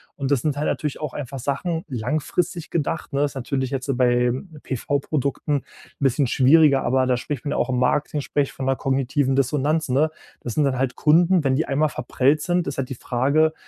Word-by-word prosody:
Und 140 0 -3
das 135 - +3
sind 145 -1 -1
halt 150 - -1
natürlich 150 -3 -2
auch 150 - -4
einfach 135 -1 -6
Sachen, 155 +6 -2
langfristig 155 - -2
gedacht, 160 -1 -2
ne, 140 +1 +2
ist 140 - -5
natürlich 130 +1 -2
jetzt 135 0 -2
bei 125 -1 +3 0.3
PV-Produkten 140 +2 -1
'n - - -32 0.4
bisschen 140 0 +2
schwieriger, 140 +2 +5
aber 130 0 +2
da 125 - +3
spricht 135 +2 -5
man 145 - -2
ja - - -1
auch 130 - 0
im 125 - 0
Marketing 145 +3 +1
sprich 140 0 -1
von 135 - -5
'ner 135 0 +2
kognitiven 135 +1 0
Dissonanz, 145 +3 +1
ne? 145 +5 +2 0.3
Das 120 - -5
sind 150 - +3
dann 130 -2 0
halt 130 -1 -1
Kunden, 170 +2 +4
wenn 130 -1 +2
die 160 - 0
einmal 150 +3 +1
verprellt 135 +3 +1
sind, 175 +2 0
ist 140 -1 -4
halt 130 - -2
die 130 - -4
Frage, 140 +7 +1
140 Hz, 205 wpm, -23 LUFS, 130-150 Hz, 0.4 s, schwieriger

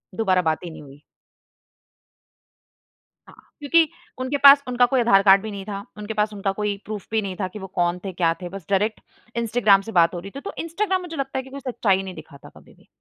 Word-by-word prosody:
दुबारा 185 -4 +2
बात 160 -1 -1
ही 175 - -6
नहीं 160 - -11
हुई। 140 0 -15 2.3
हाँ, - - -16 0.2
क्योंकि 315 +2 +3 0.3
उनके 260 +3 -1
पास 280 0 +9
उनका 250 0 +3
कोई 255 +1 +1
आधार 200 -5 +5
कार्ड 195 -1 +6
भी 220 - -6
नहीं 200 -1 -7
था। 200 -1 -6
उनके 210 +1 -5
पास 210 0 0
उनका 195 -1 -2
कोई 210 -1 -1
प्रूफ 210 -2 -7
भी 220 -1 +1
नहीं 195 -2 -5
था 185 - 0
कि - - -5
वो 190 - -7
कौन 175 0 +1
थे, 195 - -3
क्या 170 -2 +1
थे? 180 - -6
बस 195 -2 -9
डायरेक्ट 205 +3 +1 0.4
इंस्टाग्राम 220 -4 +3
से 225 - -8
बात 165 +2 +2
हो 175 - -4
रही 195 +3 -10
थी। - - -5
तो - - -7
इंस्टाग्राम 375 +3 -1
मुझे 350 -2 -8
लगता 270 -1 -3
है 260 - -5
कि 265 - -13
कोई 280 - -8
सच्चाई 195 -5 +1
नहीं 190 -1 -8
दिखाता 150 -3 -13
कभी - - -18
भी। - - -25
210 Hz, 230 wpm, -23 LUFS, 190-250 Hz, 2.3 s, पास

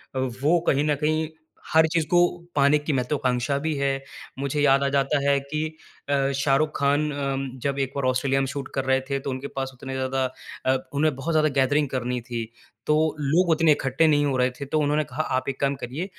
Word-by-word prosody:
अ, 130 - 0 0.2
वो 170 +3 +4
कहीं 140 +1 +3
न 150 - +3
कहीं 155 +2 0 0.4
हर 160 0 +6
चीज़ 165 -2 +2
को 175 - +5 0.4
पाने 140 +1 +5
की 145 0 -2
महत्वाकांक्षा 130 0 0
भी 160 - +1
है। 140 0 +1 0.5
मुझे 140 +1 -1
याद 140 -1 +4
आ - - +2
जाता 140 +1 +1
है 140 - +3
कि 150 +3 -3 0.4
अ, 140 -1 +2
शाहरुख 140 +3 +2
खान 145 +2 +2
अम, 135 -1 -2
जब 140 0 -1
एक 135 -1 -1
बार 140 -2 -1
ऑस्ट्रेलिया 135 +1 +1
में 135 - -1
शूट 140 -1 -5
कर 135 -1 -1
रहे 130 0 +2
थे, 135 0 0
तो 135 - -5
उनके 130 +2 -4
पास 135 0 -2
उतने 135 +2 -7
ज़्यादा 130 0 -1 0.4
अ, 130 0 +3 0.2
उन्हें 150 0 +1
बहुत 155 +5 -3
ज़्यादा 155 -1 +3
गैदरिंग 145 +2 +2
करनी 125 -1 -2
थी। 120 -1 -4 0.4
तो 150 - +4 0.2
लोग 165 +5 +2
उतने 160 -1 +4
इकट्ठे 135 +3 +2
नहीं 145 -1 +3
हो 140 -2 0
रहे 125 0 +3
थे। 135 +3 -8
तो 155 +3 0
उन्होंने 150 +1 +1
कहा, 145 +6 -3
"आप 130 +1 -1
एक 135 - -5
काम 140 0 +1
करिए, 140 +9 -4
140 Hz, 220 wpm, -24 LUFS, 135-150 Hz, 0.5 s, हर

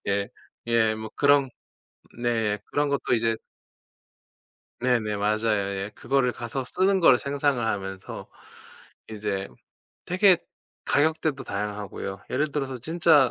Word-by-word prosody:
예 100 0 0 0.4
예. 115 -2 +3
뭐 110 0 -7
그런 140 -1 +4 0.7
네. 115 -3 +1
그런 145 0 0
것도 140 -3 0
이제 115 -1 +2 1.5
네네 120 -4 +1
맞아요. 105 -1 +1
예. 105 - -7
그거를 125 0 +1
가서 120 +3 -4
쓰는 190 +8 +2
거를 135 -7 +7
상상을 140 -3 0
하면서 95 -3 -4 0.8
이제 105 -3 -3 0.6
되게 185 0 +5 0.5
가격대도 155 -2 +1
다양하고요. 100 -1 -4
예를 145 +4 0
들어서 135 -3 -2
진짜 155 -1 +4
120 Hz, 240 characters per minute, -26 LUFS, 105-145 Hz, 1.5 s, 거를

